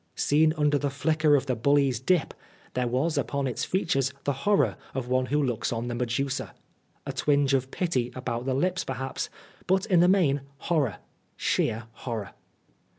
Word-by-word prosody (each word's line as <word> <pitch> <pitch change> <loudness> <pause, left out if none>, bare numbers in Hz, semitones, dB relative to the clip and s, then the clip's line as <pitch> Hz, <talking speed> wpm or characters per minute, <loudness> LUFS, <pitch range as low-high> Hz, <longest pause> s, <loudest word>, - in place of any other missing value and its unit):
Seen 155 +2 +3
under 150 -1 +2
the 145 - 0
flicker 155 +2 +2
of 135 -2 +1
the 130 -2 0
bully's 135 +1 +2
dip, 155 +5 +1 0.4
there 125 -1 0
was 140 +6 0
upon 140 +2 -1
its 125 - -2
features 135 -8 0
the 140 - 0 0.2
horror 205 - +3 0.2
of 130 -2 -2
one 130 0 +1
who 145 +2 +1
looks 120 -4 -1
on 120 +1 -2
the - - -2
Medusa: 125 +3 -2 0.5
a - - -4
twinge 145 -2 +2
of 130 -1 +1
pity 135 -8 -1
about 125 -1 -3
the 130 - +1
lips 185 +6 0
perhaps, 130 0 -4 0.4
but 190 +2 +2
in 185 -5 +3
the 175 - +6
main, 165 -8 +3 0.2
horror 140 - 0 0.4
sheer 110 +2 0
horror. 115 -3 -5
135 Hz, 170 wpm, -27 LUFS, 125-155 Hz, 0.5 s, the